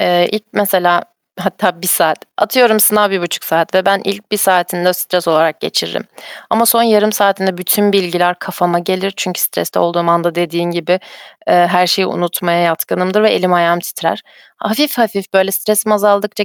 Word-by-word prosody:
eee, 175 Hz, 0 st, +2 dB
ilk 215 Hz, 0 st, -2 dB
mesela 180 Hz, -4 st, +1 dB, 0.4 s
Hatta 180 Hz, -1 st, -2 dB
1 -, -, -4 dB
saat, 165 Hz, -3 st, +2 dB, 0.2 s
atıyorum, 225 Hz, -1 st, +3 dB
sınav 210 Hz, -1 st, +4 dB
1,5 175 Hz, -3 st, -3 dB
saat 165 Hz, +1 st, -1 dB
ve 190 Hz, 0 st, +2 dB
ben 195 Hz, 0 st, +3 dB
ilk 200 Hz, +2 st, -5 dB
1 -, -, +2 dB
saatini 180 Hz, -3 st, +1 dB
de 180 Hz, -, +3 dB
stres 180 Hz, -1 st, -2 dB
olarak 160 Hz, 0 st, +1 dB
geçiririm -, -, -3 dB, 0.5 s
ama 230 Hz, +1 st, +2 dB
son 230 Hz, 0 st, +4 dB
yarım 215 Hz, -2 st, +3 dB
saatinde 195 Hz, -2 st, 0 dB
bütün 205 Hz, +3 st, +1 dB
bilgiler 180 Hz, -2 st, 0 dB
kafama 175 Hz, -1 st, -2 dB
gelir. 185 Hz, +2 st, -3 dB
Çünkü 180 Hz, -1 st, -4 dB
streste -, -, -2 dB
olduğum 170 Hz, 0 st, 0 dB
anda 170 Hz, 0 st, +1 dB
dediğin 170 Hz, 0 st, -2 dB
gibi, 175 Hz, 0 st, -2 dB, 0.6 s
eee, 175 Hz, 0 st, +5 dB
her 180 Hz, 0 st, +3 dB
şeyi 185 Hz, +2 st, +2 dB
unutmaya 175 Hz, 0 st, -2 dB
yatkınımdır 180 Hz, +4 st, 0 dB
ve 220 Hz, -, +4 dB
elim 185 Hz, 0 st, +1 dB
ayağım 175 Hz, 0 st, +2 dB
titrer. -, -, -4 dB, 0.3 s
Hafif 275 Hz, +5 st, -1 dB
hafif 205 Hz, -4 st, -2 dB
böyle 190 Hz, 0 st, +3 dB
stresim 215 Hz, +2 st, 0 dB
azaldıkça 210 Hz, 0 st, +1 dB
185 Hz, 170 wpm, -14 LUFS, 175-205 Hz, 0.6 s, eee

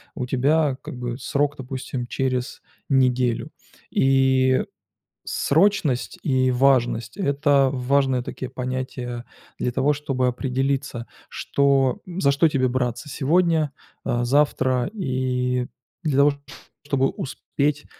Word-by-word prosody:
у 125 Hz, -, -3 dB
тебя 140 Hz, +2 st, +2 dB
как -, -, -8 dB
бы 120 Hz, 0 st, -4 dB
срок, 145 Hz, 0 st, 0 dB
допустим, 130 Hz, -1 st, -5 dB
через 130 Hz, -1 st, -2 dB, 0.3 s
неделю. 125 Hz, -3 st, +2 dB, 0.4 s
И 130 Hz, -1 st, +3 dB, 0.6 s
срочность 160 Hz, -5 st, +1 dB
и 130 Hz, -3 st, +2 dB
важность- 125 Hz, -3 st, +2 dB
это 140 Hz, -5 st, +3 dB
важные 130 Hz, -1 st, +1 dB
такие 125 Hz, +1 st, -6 dB
понятия 125 Hz, -1 st, -4 dB, 0.4 s
для 125 Hz, -, 0 dB
того, 135 Hz, +4 st, +2 dB
чтобы 135 Hz, -3 st, -1 dB
определиться, 130 Hz, -1 st, -2 dB, 0.2 s
что 135 Hz, -2 st, +1 dB
м, 180 Hz, 0 st, -6 dB
за 140 Hz, -, +4 dB
что 155 Hz, +3 st, +4 dB
тебе 130 Hz, -3 st, +1 dB
браться 125 Hz, +1 st, -2 dB
сегодня, 160 Hz, +1 st, +2 dB, 0.3 s
а, 120 Hz, 0 st, 0 dB
завтра 130 Hz, -2 st, +2 dB
и 125 Hz, -, -1 dB, 0.4 s
для 145 Hz, -4 st, 0 dB
того, 145 Hz, +1 st, +5 dB, 0.5 s
чтобы 140 Hz, -2 st, +2 dB
успеть, 145 Hz, -3 st, -3 dB
130 Hz, 115 wpm, -23 LUFS, 125-140 Hz, 0.6 s, того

